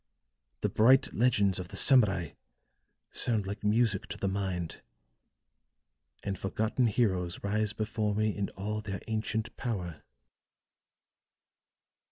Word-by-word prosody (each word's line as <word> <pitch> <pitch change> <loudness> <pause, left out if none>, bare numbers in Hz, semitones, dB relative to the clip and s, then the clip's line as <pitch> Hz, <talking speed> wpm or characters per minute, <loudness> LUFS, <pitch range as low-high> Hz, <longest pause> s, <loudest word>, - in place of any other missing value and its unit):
The - - +1
bright 130 +5 +4
legends 105 -6 +2
of 90 - -5
the - - -7
Samurai 100 - +4 0.8
sound 110 -5 +1
like 100 +2 -5
music 105 -1 +2
to - - -6
the 100 - -2
mind; 95 -4 -3 1.4
and 100 -2 -3
forgotten 110 +5 0
heroes 95 -6 0
rise 105 +1 0
before 110 -1 -1
me 110 0 +1
in 100 -1 -2
all 105 +2 -3
their 100 -3 -5
ancient 110 0 -2
power." 90 - -4
105 Hz, 115 wpm, -30 LUFS, 95-110 Hz, 1.4 s, bright